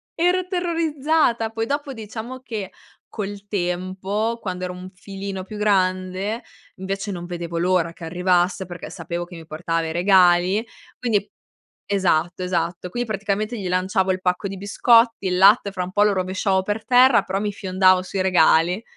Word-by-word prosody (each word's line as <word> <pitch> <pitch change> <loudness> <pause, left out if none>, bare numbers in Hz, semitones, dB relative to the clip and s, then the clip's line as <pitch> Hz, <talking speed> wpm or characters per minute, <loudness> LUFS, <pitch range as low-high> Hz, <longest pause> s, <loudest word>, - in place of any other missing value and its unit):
Ero 360 +2 +1
terrorizzata, 315 - 0
poi 225 0 -3
dopo, 285 0 -2
diciamo 225 +2 -7
che, 215 -7 -6 0.4
col 205 -1 -6
tempo, 190 +4 -2
quando 185 -2 -4
ero 180 - -5
un 180 +1 -9
filino 195 0 -6
più 210 +3 -9
grande, 190 +1 0 0.3
invece, 195 +2 -4
non 175 -2 -6
vedevo 170 -1 -4
l'ora 175 -2 +1
che 170 - -14
arrivasse 180 +2 +1
perché 175 -1 -8
sapevo 170 0 -5
che 175 0 -12
mi 165 - -10
portava 165 +1 -2
i - - -4
regali, 180 +3 +4 0.3
quindi 215 -4 0 0.6
esatto, 185 -2 0
esatto, 180 0 -2
quindi 245 +6 -3
praticamente 215 +2 -2
gli 190 - -4
lanciavo 185 +1 +1
il 185 0 -2
pacco 180 +2 0
di 195 - -6
biscotti, 230 +2 +3
il 180 -1 0
latte 200 +1 +5
fra 185 -2 -3
un 180 - -6
po' 205 +2 +3
lo 210 -1 +3
rovesciavo 190 +1 0
per 210 +2 -3
terra 255 0 +5
però 190 +1 -2
mi 210 0 -1
fiondavo 185 -1 +3
sui 190 +1 -3
regali. 180 0 +3
190 Hz, 165 wpm, -22 LUFS, 180-215 Hz, 0.6 s, latte